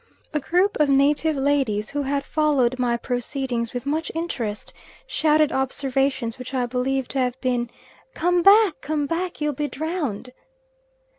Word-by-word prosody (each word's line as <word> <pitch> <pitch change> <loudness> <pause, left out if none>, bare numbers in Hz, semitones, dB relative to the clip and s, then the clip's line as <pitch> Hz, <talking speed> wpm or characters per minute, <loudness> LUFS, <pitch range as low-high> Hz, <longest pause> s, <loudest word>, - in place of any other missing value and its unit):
A 300 - +1
group 360 +7 +1
of 300 -2 +3
native 290 +3 +3
ladies, 270 -7 0
who 290 +1 -1
had 280 0 -1
followed 275 -5 +1
my 240 -1 +1
proceedings 245 -1 -3
with 245 +1 -5
much 310 +3 -1
interest, 240 -11 -4 0.3
shouted 310 - +2
observations 265 -2 -1
which 255 +1 -6
I 250 -1 +1
believe 255 +1 -1
to 270 - -2
have 250 0 -1
been 245 -2 -1 0.5
"Come 355 +2 +2
back, 395 -4 +5
come 295 0 -1
back; 335 +3 -3
you'll 300 0 0
be 295 +2 -2
drowned." 285 - -4
275 Hz, 150 wpm, -23 LUFS, 250-305 Hz, 0.5 s, back